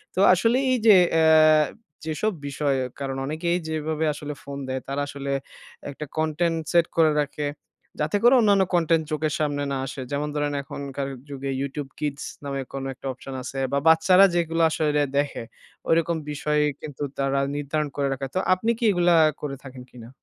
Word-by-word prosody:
তো - - -1
আসলে 230 +7 +2
এই 255 - +3
যে, 215 -3 +9 0.2
এ - - +4 0.8
যেসব 180 +7 -1
বিষয়ে 140 -1 0 0.2
কারণ 135 -1 -3
অনেকেই 170 +4 -1
যেভাবে 155 0 -2
আসলে 150 0 -6
ফোন 140 0 -7
দেয় 130 0 -3
তারা 140 +1 -2
আসলে 140 -1 -5 0.6
একটা 145 +2 -6
কনটেন্ট 160 +2 0
সেট 170 -1 +4
করে 160 -2 +5
রাখে। 145 +1 -4 0.5
যাতে 150 +6 +1
করে 240 +2 +7
অন্যান্য 200 -3 +4
কনটেন্ট 165 -2 +3
চোখের 155 -1 -1
সামনে 145 -2 -1
না 135 - -1
আসে। 135 0 -6
যেমন 145 +1 -1
ধরেন 145 -1 -1
এখনকার 140 0 -5 0.2
যুগে 140 -1 -5
YouTube 140 0 -4
kids 145 -1 -3 0.2
নামে, 140 -1 -3
কোন 135 -1 -4
একটা 135 - -16
অপশন 135 +1 -10
আছে 135 +1 -5
বা 140 - +3
বাচ্চারা 180 +4 +6
যেগুলা 165 -1 +1
আসলে 150 -2 +1
দেখে, 145 -4 -1 0.5
ঐরকম 165 0 +2
বিষয় 150 +1 0 0.2
কিন্তু 145 -1 -6
তারা 135 0 0 0.2
নির্ধারণ 145 +1 -2
করে 140 -1 +1
রাখে। 135 0 -4
তো - - +2
আপনি 220 +6 0
কি - - -6
এগুলা 175 -2 +3 0.3
করে 140 -2 -4
থাকেন 130 -2 -10
কিনা? 120 -1 -12
150 Hz, 170 wpm, -24 LUFS, 140-165 Hz, 0.8 s, যে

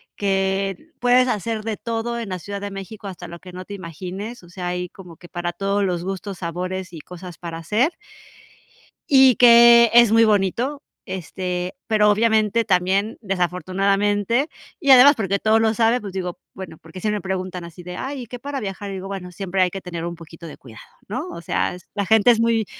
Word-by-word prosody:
que 195 -1 0 0.2
puedes 250 +1 +4
hacer 220 -1 -2
de 220 -2 -2
todo 235 +1 -3
en 225 -4 -5
la 185 - -3
Ciudad 200 +2 -6
de 205 - -4
México, 195 +1 -8
hasta 175 -2 -8
lo 170 0 -10
que 185 - -12
no 185 0 -8
te 205 - -9
imagines. 185 +5 -7
O 175 - -16
sea, 180 -1 -6
hay 180 0 -3
como 180 -4 -13
que 175 - -14
para 175 0 -4
todos 200 +1 -1
los 175 -2 -1
gustos, 195 0 -5
sabores 180 +1 -4
y 160 - -8
cosas 180 -1 -10
para 165 -2 -7
hacer. 220 - +1 1.2
Y 265 -4 +7
que 235 -1 +8
es 235 -2 +7
muy 225 0 +6
bonito, 220 +8 0 0.2
este, 180 - -4
pero 210 -1 +3
obviamente, 220 +1 +2
también, 190 +2 +1
desafortunadamente 195 - 0 0.3
y 280 - -2
además 265 +3 +9
porque 200 -2 -1
todos 220 +2 +3
lo 220 -1 +2
saben, 230 +2 +2
pues 200 -2 -7
digo, 180 -2 -4 0.2
bueno, 170 -4 -9
porque 165 +3 -11
sí 210 +1 -1
me 210 -2 -2
preguntan 185 -1 -4
así 170 +1 -11
de: 180 0 -7
"Ay, 270 0 -5
¿y - - -9
qué 245 +2 -9
para 280 +1 -4
viajar?", 200 0 -5
y - - -5
digo: 190 0 -6
"Bueno, 185 -2 -6
siempre 190 +1 -2
hay 180 - +3
que 195 +1 -7
tener 170 -2 -6
un 170 0 -4
poquito 165 0 -12
de - - -10
cuidado", - - -14 0.3
¿no?, - - -4
o 170 - -8
sea, 180 - -1 0.2
la 200 -1 -1
gente 220 +2 +5
es 230 - +2
muy 230 -2 +2
195 Hz, 205 wpm, -22 LUFS, 180-225 Hz, 1.2 s, además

